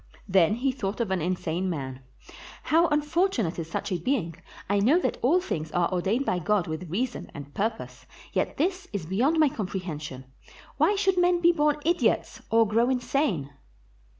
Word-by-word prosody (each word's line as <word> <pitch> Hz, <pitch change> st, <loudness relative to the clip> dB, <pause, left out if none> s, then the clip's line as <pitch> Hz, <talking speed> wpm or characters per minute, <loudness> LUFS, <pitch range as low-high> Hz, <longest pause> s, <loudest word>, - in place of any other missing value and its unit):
Then 190 Hz, 0 st, +4 dB
he 265 Hz, +3 st, 0 dB
thought 210 Hz, -5 st, -4 dB
of 225 Hz, -5 st, -1 dB
an 190 Hz, -3 st, 0 dB
insane 180 Hz, +1 st, -1 dB
man: 135 Hz, -5 st, -5 dB, 0.6 s
"How 335 Hz, +2 st, +4 dB
unfortu 300 Hz, -, +1 dB
nate 170 Hz, 0 st, -3 dB
is 165 Hz, -1 st, -5 dB
such 185 Hz, -, -3 dB
a 180 Hz, -, 0 dB
being. 175 Hz, -5 st, -1 dB, 0.3 s
I 200 Hz, +1 st, +2 dB
know 250 Hz, +12 st, +4 dB
that -, -, -2 dB
all 310 Hz, +9 st, +4 dB
things 160 Hz, -, -4 dB
are 175 Hz, 0 st, +1 dB
ordained 200 Hz, +9 st, 0 dB
by 180 Hz, -, 0 dB
God 200 Hz, +1 st, +1 dB
with 160 Hz, +2 st, -5 dB
reason 245 Hz, +8 st, -3 dB
and 145 Hz, 0 st, -9 dB
purpose, 220 Hz, +2 st, -4 dB, 0.3 s
yet -, -, -1 dB
this 370 Hz, +4 st, -1 dB
is 195 Hz, -6 st, -3 dB
beyond 245 Hz, -, +1 dB
my 310 Hz, -2 st, +5 dB
comprehension; 175 Hz, -, -5 dB, 0.5 s
why 415 Hz, -, +3 dB
should 385 Hz, -2 st, +2 dB
men 355 Hz, 0 st, +3 dB
be 345 Hz, 0 st, +5 dB
born 300 Hz, -3 st, +2 dB
idiots, 345 Hz, +1 st, +1 dB
or 225 Hz, 0 st, +4 dB
grow 230 Hz, +4 st, +2 dB
insane?" 245 Hz, -, 0 dB
215 Hz, 175 wpm, -26 LUFS, -, 0.6 s, my